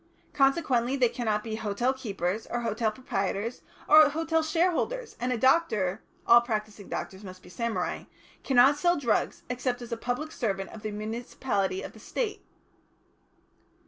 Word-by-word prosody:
Consequently 270 -3 +2
they 250 -3 +3
cannot 215 -4 -1
be 220 -1 -4
hotel 225 +4 0
keepers, 205 -5 -3
or 240 - -2
hotel 225 -1 0
proprietors, 215 0 -3 0.3
or 310 0 +8
hotel 325 +2 0
shareholders, 360 +10 0
and 250 +2 -1
a 250 - 0
doctor 220 - +2 0.2
all 235 0 +8
practising 215 -3 -4
doctors 190 +2 -5
must 185 -1 -10
be 180 - -14
samurai 235 +4 -3 0.4
cannot 270 +2 +5
sell 350 +1 +3
drugs 235 -7 0
except 250 0 -2
as 240 -1 -9
a 235 - -2
public 250 +7 -3
servant 195 -8 -2
of 220 - -10
the 215 - -3
municipality 210 -2 -2
or - - -6
the 220 - -16
State." 420 - -3
240 Hz, 150 wpm, -28 LUFS, 215-275 Hz, 0.4 s, or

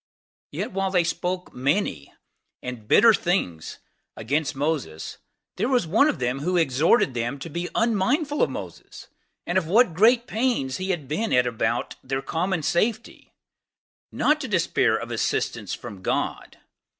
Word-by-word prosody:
Yet - - -4
while 195 0 -1
they 180 -2 +2
spake 180 +2 -3
many 135 - -1 0.5
and 120 -4 -7
sore 230 -1 +7
things 170 - -1 0.4
against 145 +6 -1
the 135 - -3 0.4
there 240 - 0
was 250 -7 +2
one 220 - +4
of 295 - -1
them 125 +2 -1
who 180 +5 0
exhorted 155 - +3
them 120 +3 -2
to 145 +4 -8
be 170 +3 -3
unmindful 250 - +1
of - - +3
Moses, - - -9 0.4
and 175 +2 +2
of 165 - -7
what 210 +1 +4
great 230 +7 +4
pains 225 - -1
he 190 +1 -4
had 165 -7 -2
been 190 - -2
at 125 0 +4
about 120 -2 -2
their 135 +1 -3
common 175 0 -1
safety; 220 +9 -1 0.8
not 305 0 +2
to 275 - -4
despair 185 -6 +2
of - - -6
assistance - - -1
from 95 -2 -10
God. - - -2
175 Hz, 150 wpm, -24 LUFS, 135-220 Hz, 0.8 s, sore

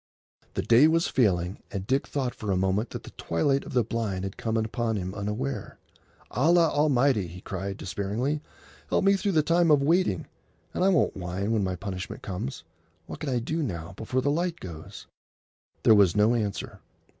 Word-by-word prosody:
The - - -1
day 120 +6 +6
was 165 +1 +2
failing, 95 -6 +1
and 95 -2 -4
Dick 135 +5 0
thought 130 -4 -2
for 105 - -6
a 95 - +2
moment 95 +5 +1
that - - -7
the - - -11
twilight 135 - 0
of - - -8
the 125 -2 +3
blind 105 -4 -2
had 95 0 -4
come 115 0 -2
upon 110 +1 -1
him 95 -2 -3
unaware. 105 +8 -4 0.5
"Allah 165 +4 +4
Almighty!" 135 - +2
he 90 +2 -10
cried 95 +1 -5
despairingly, 105 +10 -2 0.5
"help - - +2
me 195 - +6
through 195 0 -1
the 155 -2 +4
time 170 +2 +3
of 145 -2 +5
waiting, 165 - +2 0.5
and - - 0
I 195 - +5
won't 175 -6 +2
whine 95 +3 -3
when 110 -3 +2
my 95 -1 -1
punishment 95 0 -6
comes. 90 -8 -5 0.4
What - - -8
can 155 - -3
I 125 - +1
do 155 +8 -2
now, 90 - -4
before 125 +5 -1
the 145 - +1
light 170 +2 -1
goes?" 80 -4 -9 0.8
There - - +7
was 100 -5 +5
no 105 +3 +4
answer. 105 -4 -3
110 Hz, 190 wpm, -27 LUFS, 95-145 Hz, 0.8 s, There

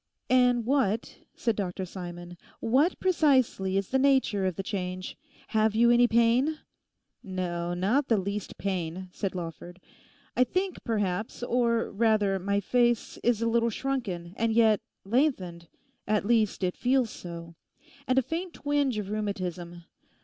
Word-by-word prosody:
'And 250 -2 +4
what,' 230 -5 0 0.2
said 230 -2 0
Dr 190 -1 -3
Simon, 175 -1 -8 0.2
'what 275 +10 +2
precisely 260 - +2
is 195 -1 -1
the 265 - +2
nature 265 -8 +2
of 185 - -2
the 195 - -4
change? 185 -2 -4 0.3
Have 215 -1 +2
you 235 +1 +5
any 240 0 +5
pain?' 235 +7 +3 0.6
'No, 175 -2 -3
not 225 +11 +1
the 225 - +3
least 200 +1 -4
pain,' 185 -1 -3
said 190 0 -4
Lawford; 175 +1 -7 0.6
'I 255 - +4
think, 370 +5 -2
perhaps, 210 0 -2
or 235 -1 +1
rather 205 -2 +2
my 200 +2 0
face 240 +2 +1
is 230 -2 +2
a - - +1
little 235 0 +2
shrunken—and 225 -5 -2
yet 220 -2 +4 0.2
lengthened; 195 - 0 0.4
at 210 -1 +1
least 220 -3 +2
it 180 -1 0
feels 250 -2 +1
so; 170 -1 -8 0.5
and 255 - +1
a 265 - +5
faint 340 +6 -4
twinge 285 -4 0
of 205 -1 -4
rheumatism. 180 -5 -4
215 Hz, 140 wpm, -28 LUFS, 185-245 Hz, 0.6 s, you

